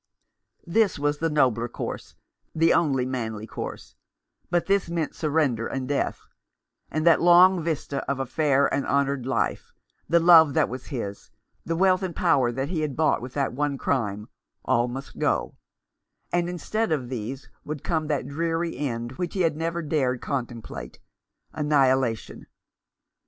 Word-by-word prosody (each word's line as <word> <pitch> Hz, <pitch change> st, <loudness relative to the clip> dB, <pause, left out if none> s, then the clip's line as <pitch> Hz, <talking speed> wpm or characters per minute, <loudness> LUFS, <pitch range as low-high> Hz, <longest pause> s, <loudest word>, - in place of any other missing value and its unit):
This 200 Hz, +3 st, +2 dB
were 145 Hz, 0 st, +1 dB
the 160 Hz, +3 st, -2 dB
nobler 125 Hz, -6 st, +2 dB
course, -, -, -6 dB, 0.4 s
the 165 Hz, +1 st, +4 dB
only 140 Hz, -7 st, +2 dB
manly 110 Hz, -4 st, -4 dB
course; -, -, -7 dB, 0.6 s
but 175 Hz, 0 st, +1 dB
this 195 Hz, -3 st, +1 dB
meant 165 Hz, -3 st, -2 dB
surrender 145 Hz, -7 st, 0 dB
and 130 Hz, -1 st, -4 dB
death; 140 Hz, 0 st, -1 dB, 0.7 s
and 155 Hz, +1 st, -2 dB
that 170 Hz, -2 st, +5 dB
long 175 Hz, +1 st, +6 dB
vista 155 Hz, -3 st, -2 dB
of 140 Hz, -1 st, -1 dB
a 135 Hz, -, -1 dB
fair 140 Hz, 0 st, +2 dB
and 140 Hz, -, +1 dB
honoured 140 Hz, -2 st, 0 dB
life, 135 Hz, -, -1 dB, 0.4 s
the 170 Hz, +1 st, +5 dB
love 165 Hz, -4 st, +7 dB
that -, -, +3 dB
was 130 Hz, +1 st, -7 dB
his, 100 Hz, -8 st, -6 dB, 0.4 s
the 165 Hz, -, -1 dB
wealth 185 Hz, +1 st, +3 dB
and 185 Hz, -3 st, -4 dB
power 130 Hz, -4 st, +2 dB
that 135 Hz, +4 st, -3 dB
he 170 Hz, -3 st, -2 dB
had 150 Hz, -4 st, -2 dB
bought 155 Hz, -5 st, +2 dB
with 125 Hz, +1 st, -8 dB
that 140 Hz, -3 st, 0 dB
one 145 Hz, +1 st, -1 dB
crime, 105 Hz, -7 st, -1 dB, 0.4 s
all 120 Hz, +1 st, +2 dB
must 135 Hz, +3 st, -8 dB
go; -, -, 0 dB, 0.8 s
and 175 Hz, 0 st, +1 dB
instead 215 Hz, +4 st, -2 dB
of 140 Hz, -6 st, -1 dB
these 130 Hz, +2 st, -6 dB
would 150 Hz, -2 st, -6 dB
come 160 Hz, -2 st, -1 dB
that 145 Hz, -4 st, -1 dB
dreary 165 Hz, +3 st, -2 dB
end 120 Hz, -4 st, -3 dB
which 175 Hz, 0 st, -3 dB
he 190 Hz, -, +1 dB
had 165 Hz, -3 st, +2 dB
never 165 Hz, +2 st, -2 dB
dared 135 Hz, -5 st, 0 dB
contemplate 120 Hz, -5 st, -5 dB, 0.3 s
— -, -, -53 dB
annihilation. 135 Hz, -6 st, +1 dB
145 Hz, 160 wpm, -25 LUFS, 130-165 Hz, 0.8 s, love